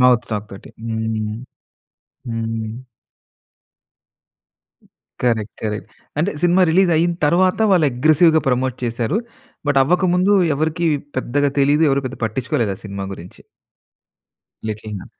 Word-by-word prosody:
Mouth 125 -2 +5
talk 105 -1 -3
తోటి. 100 - -11
హ్మ్. 110 -1 -2 1.0
హ్మ్. 115 -1 -3 2.5
Correct, 110 -3 0
correct. 105 0 -4 0.3
అంటే 180 +6 +1
సినిమా 175 +2 +4
రిలీజ్ 185 +1 +4
అయిన 170 +2 +2
తరువాత, 180 +6 +3
వాళ్ళు 175 -5 +4
అగ్రెసివ్‌గా 155 +5 +4
ప్రమోట్ 130 0 0
చేసారు. 120 - -1 0.5
బట్, 145 -1 +3
అవ్వకముందు 180 +5 +2 0.2
ఎవరికీ 160 +3 0 0.3
పెద్దగా 140 +2 0
తెలియదు, 145 +3 +4
ఎవరు 135 0 +1
పెద్దగా 130 -1 -8
పట్టించుకోలేదు 120 -1 -1
ఆ - - -12
సినిమా 100 -1 -5
గురించి. 90 -1 -12 1.3
'Little 105 0 -5
huts'. - - -16
130 Hz, 115 wpm, -20 LUFS, 110-160 Hz, 2.5 s, Mouth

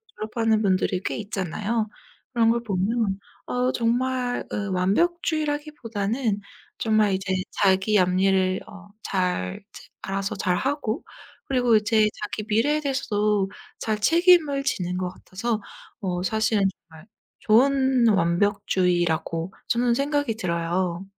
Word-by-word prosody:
졸업하는 220 0 0
분들이 185 -1 +1
꽤 - - -2
있잖아요. 210 +2 -2 0.5
그런 230 -1 +3
걸 235 0 +1
보면 200 0 0 0.3
어 250 +1 0
정말 245 +1 0
으 205 -1 -2
완벽주의라기보다는 255 - -1 0.4
정말 215 -3 +2
이제 190 0 -1 0.2
자기 195 +1 +3
앞일을 185 +1 +2
어 200 0 -13
잘 180 - -2
체 - - -11 0.2
알아서 195 0 -3
잘하고 260 - -1 0.4
그리고 245 -4 +2
이제 215 0 +3
자기 210 0 -4
미래에 245 +8 +2
대해서도 210 -8 0 0.3
잘 215 -1 -2
책임을 330 - +4
지는 180 -9 -1
것 180 -1 -2
같아서 210 +4 -4 0.4
어 180 -2 -2
사실은 220 0 +1 0.3
정말 160 +3 -14 0.3
좋은 260 +1 +4
완벽주의라고 175 -2 +1
저는 240 0 +2
생각이 285 -3 0
들어요. 175 -1 -2
210 Hz, 265 characters per minute, -24 LUFS, 190-245 Hz, 0.5 s, 책임을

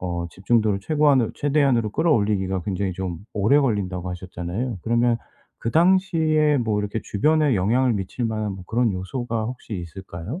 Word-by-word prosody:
어 85 -1 -3
집중도를 105 +1 +1
최고한으 145 -2 +3
최대한으로 140 -7 +2
끌어올리기가 100 - +1
굉장히 95 0 -2
좀 90 -2 -4 0.2
오래 110 +8 +4
걸린다고 95 -8 -1
하셨잖아요. 90 +5 -4
그러면 120 0 +2 0.4
그 115 - -3
당시에 160 -4 +3
뭐 110 -3 0
이렇게 105 +2 -3
주변에 150 +5 +2
영향을 120 +7 +2
미칠 105 +4 -3
만한 110 -2 -2
뭐 95 -1 -9
그런 115 +1 +1
요소가 115 +4 -3
혹시 120 -2 -6
있을까요? 90 - -7
110 Hz, 390 characters per minute, -23 LUFS, 95-130 Hz, 0.4 s, 오래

